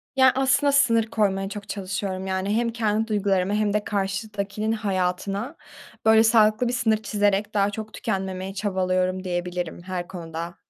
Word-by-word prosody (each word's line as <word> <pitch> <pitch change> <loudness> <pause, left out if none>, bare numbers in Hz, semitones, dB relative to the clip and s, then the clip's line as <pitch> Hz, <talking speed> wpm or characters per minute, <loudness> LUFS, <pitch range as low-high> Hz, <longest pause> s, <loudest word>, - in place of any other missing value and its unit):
Ya, 260 -1 +6
aslında 270 +2 +3
sınır 230 -5 +4
koymaya 195 -3 0
çok 205 -1 -8
çalışıyorum. 190 -1 -3
Yani 190 +2 -1
hem 235 0 +1
kendi 220 -1 0
duygularımı 200 -2 +1
hem 210 -1 +1
de 210 0 +1
karşıdakinin 205 +1 -2
hayatına, 200 - -2 0.5
böyle, 220 0 +6
sağlıklı 220 +1 +4
bir 245 - -1
sınır 225 -2 +2
çizerek 205 -1 0
daha 200 -1 +2
çok 215 +1 -7
tükenmemeye 190 0 -3
çabalıyorum 185 -2 0
diyebilirim 175 -2 -3
her 180 -1 -4
konuda 170 -1 -6
205 Hz, 145 wpm, -24 LUFS, 185-220 Hz, 0.5 s, Ya